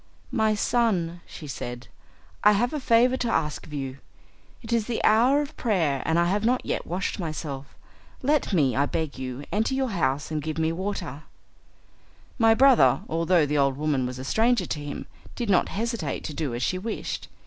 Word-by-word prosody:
"My 220 -2 +2
son," 190 -7 0
she 155 - -10
said, 120 -3 -6 0.6
"I 210 - +7
have 240 +6 +1
a 300 - -1
favour 250 0 +4
to 240 - -1
ask 150 -8 -1
of - - -14
you. 135 -2 -5 0.6
It 230 +1 -3
is 230 -2 +1
the 240 - -1
hour 250 +7 +4
of 290 - -9
prayer 165 - +1
and 160 - +2
I 170 - +4
have 200 +4 0
not 250 +3 +1
yet - - -2
washed 185 +3 -2
myself. 150 -5 -5 0.5
Let 290 -1 +2
me, 145 -9 +2
I 140 +1 +2
beg 155 -4 -3
you, 130 +1 -5
enter 225 +6 +1
your 265 -1 0
house, 145 -7 -1
and 155 -1 -1
give 155 +1 -4
me 160 0 +1
water." 165 -5 -4 1.1
My 225 -1 +5
brother, 265 +1 +5
although 165 0 +2
the 145 0 0
old 135 -1 +2
woman 145 -4 0
was 125 0 -6
a 130 - -6
stranger 225 - +2
to 150 - -3
him, 145 0 -6 0.3
did 235 -4 -1
not 185 - +3
hesitate 230 +3 -3
to 155 - -5
do 145 -6 -3
as 120 - -3
she 185 - 0
wished. 220 +3 -4
175 Hz, 190 wpm, -26 LUFS, 145-225 Hz, 1.1 s, I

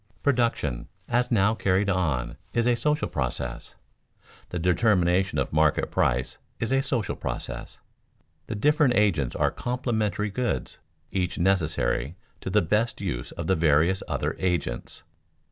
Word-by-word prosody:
Production 115 - +1 0.2
as 125 +1 +1
now 105 -2 +3
carried 100 -2 +1
on 75 -11 0 0.2
is 115 -1 +2
a 125 - +4
social 150 +6 +1
process; 60 -4 -4 0.7
the 90 - -4
determination 90 +1 +2
of - - -1
market 80 -1 +2
price 60 0 0 0.2
is 115 - -2
a 135 0 +3
social 125 -6 -1
process. - - -5 0.7
The 110 - -3
different 145 +2 +3
agents 85 -12 +2
are - - +2
complementary 110 -5 -1
goods, 125 +4 -2 0.3
each 90 -2 -1
necessary 85 -4 +1 0.2
to - - -5
the 105 +1 +3
best 110 +8 0
use 80 -12 -4
of - - -5
the 95 - +2
various 80 +4 +3
other - - -1
agents. 85 -10 -2
95 Hz, 135 wpm, -26 LUFS, 80-115 Hz, 0.7 s, a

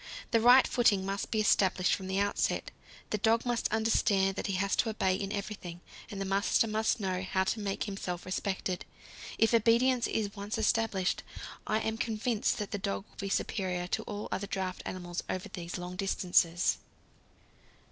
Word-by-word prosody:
The 230 - +4
right 245 +3 +8
footing 205 -6 +3
must 195 +1 -3
be 220 - 0
established 190 -3 +3
from 190 -2 -3
the 190 0 -1
outset; 200 0 0 0.4
the 215 - 0
dog 225 +3 +2
must 240 -1 0
understand 205 -3 +2
that - - -3
he 195 - -1
has 195 +2 +1
to 230 - +2
obey 190 -4 +1
in 195 +1 -3
everything, 200 -4 -5 0.3
and 200 - -6
the 195 - -2
master 195 +3 +2
must 220 0 0
know 185 -2 -1
how 190 0 0
to 215 - -1
make 200 -2 -2
himself 185 -4 -4
respected. 185 -1 -2 0.5
If 225 +1 +3
obedience 235 +2 +4
is 205 -2 -2
once 205 +2 -4
established, 220 -4 +1 0.5
I 215 +1 +1
am 220 0 -2
convinced 225 0 0
that 210 -2 -4
the 205 - -2
dog 195 +1 -3
will - - -25
be 195 -1 -4
superior 185 -3 -1
to 220 - 0
all 205 0 -5
other 195 +2 -2
draught 190 -2 -3
animals 175 -1 -4
over 185 - -3
these 170 -1 -6
long 180 +1 -6
distances. 175 -3 +2
200 Hz, 180 wpm, -31 LUFS, 185-220 Hz, 0.5 s, right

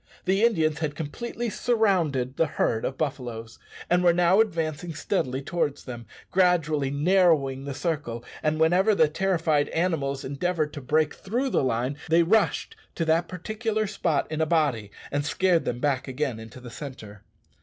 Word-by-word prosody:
The 195 +3 +2
Indians 160 -10 +2
had 150 -2 -2
completely 230 +10 -4
surrounded 175 - +1
the 165 - +2
herd 115 -5 0
of 130 - -3
buffaloes, 120 -6 -4 0.3
and 180 +1 +2
were 175 -1 +5
now 180 +4 +4
advancing 165 -5 -2
steadily 135 -7 -2
towards 150 -2 -2
them, 120 -3 -8 0.2
gradually 165 -6 +2
narrowing 145 -3 +2
the 140 -1 -5
circle, 145 -8 -3 0.2
and 155 0 0
whenever 180 +6 +4
the 160 - +5
terrified 160 -3 +1
animals 150 -6 -1
endeavoured 155 +2 -1
to 145 - -6
break 155 +3 +1
through 245 +7 -2
the - - +2
line, 125 +2 -1
they 165 +1 +5
rushed 220 - +1 0.2
to 165 - -1
that 165 +2 +2
particular 215 +4 -2
spot 170 -7 0
in 155 0 -1
a 160 - +2
body, 145 -11 +1 0.2
and 145 +1 0
scared 175 +3 +2
them 120 - -2
back 140 -1 0
again 130 -3 -2
into 110 +3 -11
the 125 -1 -10
centre. 110 -7 -9
155 Hz, 165 wpm, -26 LUFS, 135-180 Hz, 0.3 s, were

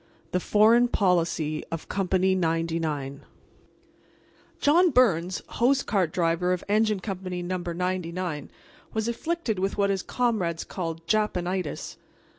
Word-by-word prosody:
THE 180 - +1
FOREIGN 225 +6 +5
POLICY 170 -7 +1
OF 165 -1 -5
COMPANY 190 -1 +1
99 165 -5 -1 1.4
John 345 +5 +5
Byrnes, 190 - +2
hose 265 +3 +2
cart 185 -7 0
driver 170 +1 +1
of 180 - -3
Engine 215 -1 +2
Company 185 -3 -4
No. 185 +1 -2
99, 175 -2 -3 0.5
was 220 0 0
afflicted 235 - -2
with 195 +2 -1
what 200 -1 +2
his 195 -1 -1
comrades 200 -11 -1
called 165 -3 -5
Japanitis. 185 -4 -1
185 Hz, 115 wpm, -26 LUFS, 170-215 Hz, 1.4 s, FOREIGN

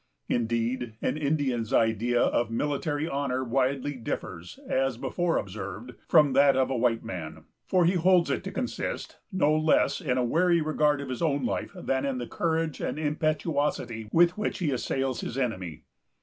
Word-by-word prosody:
Indeed, 115 0 -1
an - - +1
Indian's 140 -7 -1
idea 115 +2 +2
of 120 -1 +2
military 145 +5 -1
honor 135 -3 -1
widely 135 +3 0
differs, 90 -6 -6
as 135 -2 0
before 175 +6 0
observed, 100 +4 -5 0.2
from 150 -5 +5
that 140 0 +5
of 130 0 +2
a - - 0
white 115 -1 +1
man; 80 -4 -6 0.2
for 180 -2 +3
he 175 - +3
holds 180 0 +3
it - - -1
to - - -4
consist - - -4
no 155 -5 +2
less 155 +4 +2
in 130 -7 0
a 125 - +2
wary 170 +7 +3
regard 150 -1 +2
to 140 - -6
his 130 -2 -5
own 145 -5 +1
life 120 - -2
than 130 0 -1
in 135 -2 -1
the 120 - -3
courage 160 +2 -1
and - - -2
impetuosity 150 -7 -1
with 175 +3 +4
which 210 - -1
he 170 -6 0
assails 135 0 -1
his 120 - -5
enemy. 95 - -3
135 Hz, 170 wpm, -27 LUFS, 120-155 Hz, 0.2 s, from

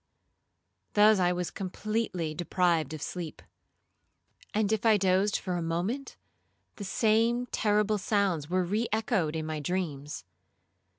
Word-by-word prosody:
Thus 210 0 +6
I 180 -1 +3
was 180 -1 -2
completely 195 -4 -2
deprived 170 -2 +1
of 150 - -6
sleep; 175 -4 -5 1.1
and 210 -1 +1
if 220 -2 0
I 220 -2 +5
dozed 190 +1 +2
for 180 -2 -3
a - - -2
moment, 180 +12 -2 0.6
the 205 - -6
same 225 +4 +2
terrible 210 -2 +1
sounds 190 -8 0
were 185 +1 +2
re 210 +6 0
echoed 210 -8 0
in 160 -1 -2
my 155 -1 -3
dreams. 150 - -3
190 Hz, 130 wpm, -29 LUFS, 170-215 Hz, 1.1 s, Thus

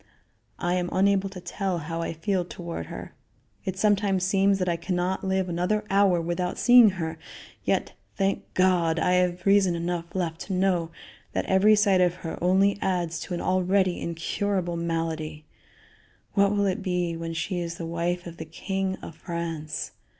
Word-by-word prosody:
I 175 0 -1
am 180 -1 0
unable 195 0 +2
to 190 -1 -9
tell 190 0 -2
how 165 +1 -4
I - - -2
feel 180 +3 -1
toward 170 - -6
her. - - -8 0.5
It 190 -1 -3
sometimes 200 -2 +2
seems 195 +1 +3
that 185 -1 -1
I 170 - +2
can 170 +2 -3
not 180 +2 -1
live 190 -1 0
another 180 +5 0
hour 195 -3 +4
without 175 +2 -2
seeing 245 -3 +7
her; 160 -1 -4 0.5
yet, - - 0 0.2
thank 195 0 -1
God, 180 -3 +3
I 180 - +2
have 180 0 +1
reason 195 -3 +4
enough 170 0 -3
left 170 -3 -2
to 195 - -3
know 180 -3 +1 0.4
that - - -1
every 200 +3 +5
sight 200 -3 +4
of 180 -1 +3
her 160 - -4
only 195 +3 +3
adds 175 -4 -1
to 180 - -4
an - - -4
already 185 0 +2
incurable 175 +2 -2
malady. 165 -2 -3 0.9
What 200 -1 +4
will 205 -1 +1
it 190 -1 0
be 180 -3 -1
when 165 0 -5
she 175 +2 -2
is 170 -1 -4
the 165 - -5
wife 170 +2 -2
of 170 -1 -8
the 160 - -6
king 190 +4 -3
of - - -7
France? 165 -2 -4
180 Hz, 175 wpm, -26 LUFS, 170-195 Hz, 0.9 s, seeing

